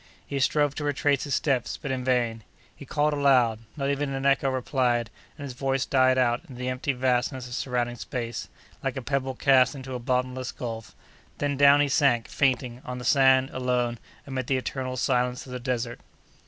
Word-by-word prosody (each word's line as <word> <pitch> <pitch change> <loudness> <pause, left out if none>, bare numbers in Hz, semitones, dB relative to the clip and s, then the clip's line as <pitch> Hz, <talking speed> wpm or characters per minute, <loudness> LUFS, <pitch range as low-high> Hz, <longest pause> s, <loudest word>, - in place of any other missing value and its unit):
He 140 - -3
strove 145 +1 +2
to 150 - -5
retrace 145 -1 +1
his 140 - 0
steps, 135 -5 0
but 135 - -5
in 130 -1 -2
vain. 120 -3 0 0.3
He 140 - -12
called 150 0 +1
aloud. 130 -6 +3 0.2
Not 140 -1 -1
even 140 -1 -2
an 135 0 -3
echo 135 0 +3
replied, 125 -3 0 0.3
and 145 - -8
his 135 -3 -6
voice 135 +1 -1
died 130 -1 +3
out 120 -1 +2
in 130 - -9
the 125 +1 -3
empty 130 +2 -1
vastness 125 0 0
of 120 - -9
surrounding 120 -1 -2
space, 120 0 -5 0.4
like - - -2
a 130 - -4
pebble 135 0 -1
cast 130 -2 +4
into 130 -1 -7
a 125 - -3
bottomless 125 0 -1
gulf; 115 -2 -6 0.4
then, 145 -1 -1
down 140 +1 +6
he 145 - +3
sank, 130 -4 +2
fainting, 125 -3 0
on 125 0 -5
the 125 - -7
sand, 130 0 +4
alone, 125 -2 -1 0.3
amid 130 -3 -4
the 135 - +2
eternal 130 0 -4
silence 125 -1 0
of 130 - -11
the 125 - -4
desert. 125 -2 -3
130 Hz, 195 wpm, -26 LUFS, 125-140 Hz, 0.4 s, down